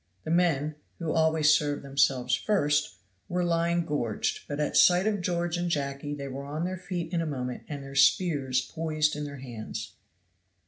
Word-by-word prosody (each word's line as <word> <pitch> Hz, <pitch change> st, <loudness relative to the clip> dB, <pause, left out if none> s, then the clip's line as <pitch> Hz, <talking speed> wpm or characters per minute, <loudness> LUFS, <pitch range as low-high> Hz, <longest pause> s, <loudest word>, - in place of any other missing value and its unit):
The 155 Hz, -, -4 dB
men, 155 Hz, -4 st, +2 dB, 0.2 s
who 165 Hz, -3 st, -2 dB
always 160 Hz, -1 st, +4 dB
serve 145 Hz, -2 st, 0 dB
themselves 135 Hz, -2 st, +1 dB
first, 145 Hz, -, +1 dB, 0.3 s
were 180 Hz, 0 st, 0 dB
lying 170 Hz, 0 st, +1 dB
gorged 120 Hz, -9 st, -2 dB
but 145 Hz, 0 st, -4 dB
at 150 Hz, -, -1 dB
sight 180 Hz, +2 st, +6 dB
of 210 Hz, -3 st, 0 dB
George 175 Hz, -1 st, -1 dB
and 175 Hz, 0 st, -1 dB
Jacky 145 Hz, -1 st, -2 dB
they 140 Hz, -1 st, -6 dB
were 135 Hz, +1 st, -6 dB
on 155 Hz, +4 st, -3 dB
their 185 Hz, 0 st, -3 dB
feet 175 Hz, -2 st, -4 dB
in 170 Hz, -, +1 dB
a 165 Hz, -, -2 dB
moment 125 Hz, -4 st, -4 dB
and 145 Hz, -2 st, -5 dB
their 135 Hz, 0 st, -9 dB
spears 140 Hz, -2 st, +3 dB
poised 155 Hz, 0 st, -1 dB
in 150 Hz, 0 st, -4 dB
their 140 Hz, -1 st, -7 dB
hands. 110 Hz, -4 st, -7 dB
150 Hz, 180 wpm, -28 LUFS, 140-170 Hz, 0.3 s, sight